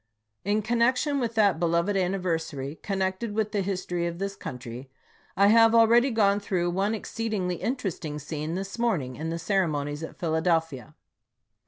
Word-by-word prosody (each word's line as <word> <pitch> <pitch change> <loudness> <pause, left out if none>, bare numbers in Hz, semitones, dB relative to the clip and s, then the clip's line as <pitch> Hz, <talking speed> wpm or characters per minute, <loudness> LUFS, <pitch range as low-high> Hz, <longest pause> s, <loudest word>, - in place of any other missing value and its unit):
In 210 +2 +1
connection 245 +6 +2
with 235 -2 -2
that 200 -6 +3
beloved 170 +4 +1
anniversary, 165 -6 -2
connected 195 +2 -2
with 215 -1 0
the 205 - 0
history 180 -2 -2
of 170 0 -5
this 195 +1 -3
country, 125 -1 -8 0.5
I 200 +1 +6
have 225 +1 +6
already 235 +3 +6
gone 205 -4 +3
through 180 -4 -1
one 200 +5 0
exceed 225 +1 -4
ingly 180 -3 -1
interesting 190 - -3
scene 150 +2 -4
this 195 +4 -5
morning 160 - 0
in 160 +1 -4
the 165 - -2
ceremonies 155 -6 -1
at 160 - -7
Philadelphia. 160 -4 -1
190 Hz, 155 wpm, -27 LUFS, 160-215 Hz, 0.5 s, I